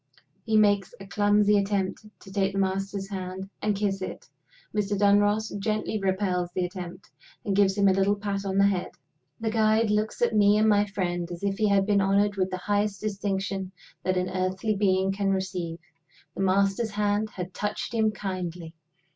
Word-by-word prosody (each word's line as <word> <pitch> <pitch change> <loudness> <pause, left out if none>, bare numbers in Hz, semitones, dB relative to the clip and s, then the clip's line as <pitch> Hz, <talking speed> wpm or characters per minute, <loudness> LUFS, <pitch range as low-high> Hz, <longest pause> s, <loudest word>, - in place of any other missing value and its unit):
He 220 -1 +2
makes 205 -3 +3
a 195 - -9
clumsy 205 +1 +3
attempt 200 +1 -2
to 195 - -13
take 195 -1 +1
the - - -3
Master's 195 +1 -1
hand 190 -1 -5
and 210 -1 +1
kiss 195 -1 -1
it. - - -6 0.5
Mr. 205 -1 0
Dunross 205 +2 +3
gently 215 +1 -1
repels 190 -2 0
the 185 - 0
attempt, 180 0 -8 0.3
and 200 -2 0
gives 195 0 +3
him 200 -1 +4
a 190 - +5
little 195 +2 +2
pat 200 -1 -3
on 195 -1 -2
the 200 - +5
head. 195 -3 0 0.5
The 220 -1 -1
guide 220 0 +3
looks 210 +2 0
at 235 - +2
me 205 0 +5
and 215 +1 +3
my 205 -1 +4
friend 175 -3 -2
as 175 +2 -7
if 200 0 -1
he 215 - +3
had 195 -1 +3
been 205 -1 +3
honored 200 +1 +2
with 190 -1 0
the 185 - -3
highest 205 +1 -1
distinction 195 -2 -3 0.3
that 185 0 0
an 180 0 -1
earthly 190 +3 -1
being 190 -1 +2
can 195 0 -1
receive. 185 -3 -2 0.6
The - - -3
Master's 195 +4 +2
hand 210 +1 0
had 180 -2 -7
touched 210 +1 -3
him 220 -1 +3
kindly! 180 -5 -5
200 Hz, 185 wpm, -26 LUFS, 190-210 Hz, 0.6 s, a